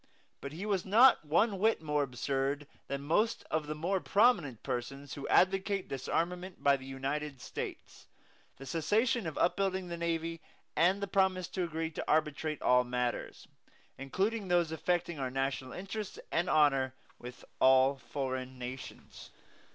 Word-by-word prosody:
But 140 - -6
he 180 +6 -5
was 200 -4 0
not 230 +4 +6
one 190 +7 +2
whit 220 +3 +3
more 150 -2 0
absurd 135 +2 -1 0.2
than 140 0 -4
most 210 +10 +1
of 155 -1 0
the 155 - -3
more 180 +5 0
prominent 180 - +2
persons 135 +3 -4
who 140 - -6
advocate 195 +1 +2
disarmament 175 +7 -3
by 140 0 +5
the 130 -1 -9
United 135 +1 -3
States, - - -7 0.5
the 135 - -10
cessation 205 - +1
of 160 - -5
up 175 - +2
building 190 -2 -1
the 170 - -4
navy, 165 -1 -2 0.3
and 185 +5 +3
the - - -1
promise 190 -1 +1
to 185 - -2
agree 160 -1 -3
to - - -4
arbitrate 155 0 0
all 125 0 +5
matters, 125 0 -3 0.5
including 195 - -1
those 175 -2 +2
affecting 170 0 -1
our 130 -1 -1
national 135 0 -2
interests 195 - -6
and 170 +2 +1
honor, 135 -4 +3 0.2
with 125 0 -10
all 130 +1 +5
foreign 130 0 -4
nations. 125 +1 -8
155 Hz, 150 wpm, -32 LUFS, 135-185 Hz, 0.5 s, not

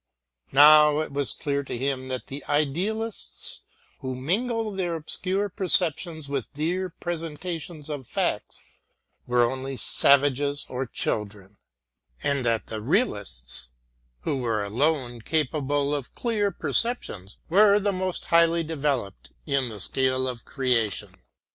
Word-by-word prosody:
Now 150 +1 +7
it 155 - -5
was 140 -1 0
clear 140 -1 -2
to 130 - -5
him 130 0 -2
that 130 -1 -4
the 140 +1 -7
idealists 190 +10 -1 0.3
who 130 -1 -4
mingle 220 - -1
their 180 -4 -2
obscure 185 +5 -2
perceptions 175 -5 +1
with 140 -3 -3
dear 175 +5 -1
presentations 165 -2 -5
of 145 -5 -5
facts - - -2 0.6
were 120 0 +3
only 130 +2 -2
savages 140 +2 +3
or 130 +1 -4
children, 105 -3 -3 0.7
and 140 -2 +1
that 115 -2 0
the 110 -1 -5
realists, 100 - -1 0.5
who 140 - -1
were 115 -5 -1
alone 120 +2 0
capable 145 0 0
of 140 -4 -4
clear 215 -4 0
perceptions, 155 - -2
were 200 +3 +5
the 205 0 +1
most 185 -1 -2
highly 170 0 +4
developed 140 - -2
in 140 -4 0
the 105 -2 -8
scale 130 +4 +2
of 125 -3 -5
creation. 125 -7 0
145 Hz, 125 wpm, -25 LUFS, 130-170 Hz, 0.7 s, Now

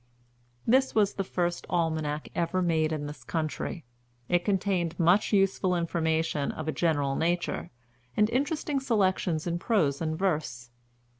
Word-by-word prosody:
This 260 +3 +3
was 205 -2 +3
the 195 - -2
first 175 -2 -2
Almanac 160 -3 -1
ever 175 +2 0
made 160 -2 +1
in 150 -2 -2
this 145 +1 -8
country. 160 0 -3 0.4
It 175 0 +2
contained 190 -4 0
much 175 +5 +4
useful 195 -2 +2
information 160 -3 0
of 155 - -6
a - - +1
general 145 -5 +1
nature, 170 +3 -1 0.5
and 210 - +5
interesting 285 +2 0
selections 190 - +1
in 170 0 -1
prose 170 - +1
and 160 -1 -1
verse. 150 -10 -2
170 Hz, 140 wpm, -28 LUFS, 155-195 Hz, 0.5 s, and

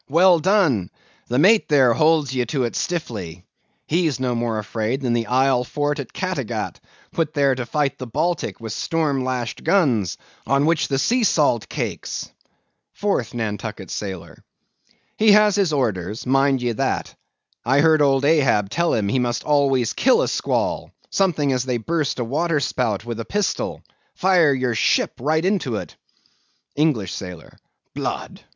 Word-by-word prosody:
Well 175 +3 +5
done! 160 - +2 0.4
The 125 - -1
mate 205 +9 +4
there 135 -5 +5
holds 155 0 +2
ye 125 -1 +1
to 130 +2 -1
it 120 - -3
stiffly. 100 - -4 0.4
He's 160 -4 0
no 125 -1 0
more 115 -2 -1
afraid 110 +5 -2
than 125 -3 0
the 115 -2 -1
isle 130 0 +2
fort 145 +3 -2
at 135 - -6
Cattegat, - - -4 0.3
put 160 -2 -2
there 140 -2 +3
to 125 -2 -4
fight 145 +2 -1
the 130 - -6
Baltic 160 +7 -2
with 110 -2 -6
storm 150 -3 -1
lashed 125 -2 -3
guns, 125 - +2 0.3
on 140 +3 +2
which 160 -1 +2
the 135 - -1
sea 240 - +1
salt - - +2
cakes! - - -4 0.7
4TH 195 - -1
NANTUCKET 110 -3 -4
SAILOR. 95 -4 -6 0.7
He 215 -1 +5
has 210 -1 +5
his 195 -5 +2
orders, 110 - -2
mind 135 0 +2
ye 120 - +1
that. 110 - -2 0.5
I 135 +4 +3
heard 155 -1 +4
old 135 -1 +3
Ahab 135 -10 +2
tell 170 0 +1
him 105 -3 0
he 115 +6 +1
must 120 -1 -1
always 135 -5 +2
kill 260 - +3
a - - -1
squall, - - -1 0.2
something 155 -8 +1
as 125 -1 0
they 125 -2 -1
burst 150 +4 -2
a 125 - -1
waterspout 130 - -1
with 115 -1 -5
a 115 - -4
pistol—fire 185 -4 0
your 125 -2 -1
ship 110 - +1
right 155 +6 0
into 185 - 0
it! - - -6 0.8
ENGLISH 140 - 0
SAILOR. 90 -4 -8 0.4
Blood! - - -5
135 Hz, 160 wpm, -21 LUFS, 120-160 Hz, 0.8 s, Well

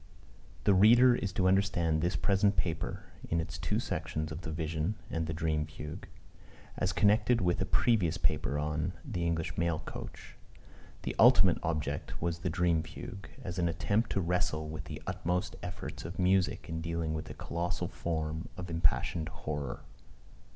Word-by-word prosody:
[THE 100 - +5
reader 120 +6 +7
is 100 -5 -1
to 95 - +2
understand 90 -5 +2
this 85 +2 0
present 100 0 +2
paper, 90 +3 -2 0.3
in 85 - +1
its 80 - -4
two - - 0
sections 80 0 -3
of 80 +2 -5
The 80 - -6
Vision, 80 +4 -1 0.2
&c., - - -4
and 80 -1 0
The 80 - -2
Dream 80 -2 0
Fugue, 75 +3 -8 0.7
as 95 - 0
connected 105 +4 +4
with 90 -2 +1
a - - 0
previous 100 -10 +2
paper 75 -2 0
on 75 +4 -1
The 100 -11 -3
English 80 -1 -1
Mail 85 -2 +1
Coach. - - -8 0.7
The - - -3
ultimate - - +7
object 80 -2 -2
was 85 0 -1
the 90 +1 -1
Dream 85 -1 +2
Fugue, 100 +7 -8
as 90 -3 -4
an 85 -1 +2
attempt 100 +7 0
to 100 - +1
wrestle 85 -3 0
with 80 0 -6
the - - -7
utmost 90 +1 -1
efforts - - -6
of 85 +2 -6
music 95 0 +2
in 80 0 -3
dealing 85 -1 -2
with 80 - -4
a - - -7
colossal 90 +1 -2
form 80 -1 -3
of 90 -1 -6
impassioned 80 0 +1
horror. 75 -4 -4
85 Hz, 170 wpm, -31 LUFS, 80-95 Hz, 0.7 s, reader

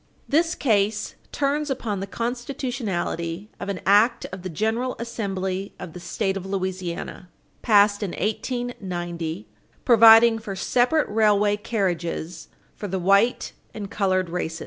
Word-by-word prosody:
This 330 +4 +2
case 210 -4 +1 0.2
turns 290 +1 0
upon 230 -7 -2
the 195 - -4
constitutionality 230 - -3
of - - -5
an 195 -3 -3
act 210 +5 +4
of 185 0 -7
the 185 - -5
General 220 +8 -1
Assembly 195 -4 -4
of 165 - -8
the 180 - -8
State 190 +3 -2
of 195 - -4
Louisiana, 185 -2 -4 0.3
passed 205 -1 +4
in 195 -4 -3
1890, 185 -6 -3 0.4
providing 225 -1 +7
for 210 -3 -6
separate 250 +10 +2
railway 210 -1 +3
carriages 175 -6 -3 0.3
for 205 - -6
the 190 0 -2
white 200 +6 +2 0.2
and 205 -2 -6
colored 185 -3 0
races. 165 -2 -3
205 Hz, 130 wpm, -24 LUFS, 185-230 Hz, 0.4 s, providing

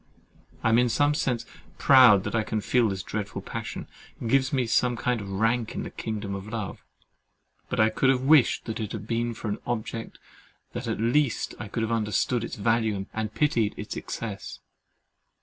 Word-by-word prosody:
I 115 - +3
am 115 +1 +5
in 125 0 +3
some 145 +5 +3
sense 125 -5 -1 0.3
proud 125 -8 +7
that - - -4
I 115 - +2
can 110 0 -2
feel 115 +2 +2
this 95 -1 -4
dreadful 105 -2 -4
passion—it 115 - -7
gives 130 +2 +3
me 130 -2 +2
a 125 +2 +2
kind 120 -1 -1
of 100 - -7
rank 115 +4 0
in - - -3
the - - -7
kingdom 105 -3 -4
of 95 +1 -6
love—but 115 +3 -9
I 110 0 +5
could 130 +4 +2
have 130 -1 +3
wished 140 -4 +4
it 110 - -3
had 105 -2 -5
been 115 +1 -1
for 110 - -6
an 105 0 -2
object 115 -1 -4 0.6
that - - -4
at - - -2
least 120 +3 +1 0.2
could 115 - -1
have 110 - -1
understood 115 +2 0
its - - -5
value 110 -2 +1
and 110 -1 -3
pitied 115 -8 +1
its 105 - -5
excess. 105 -4 -5
115 Hz, 180 wpm, -26 LUFS, 105-125 Hz, 0.6 s, proud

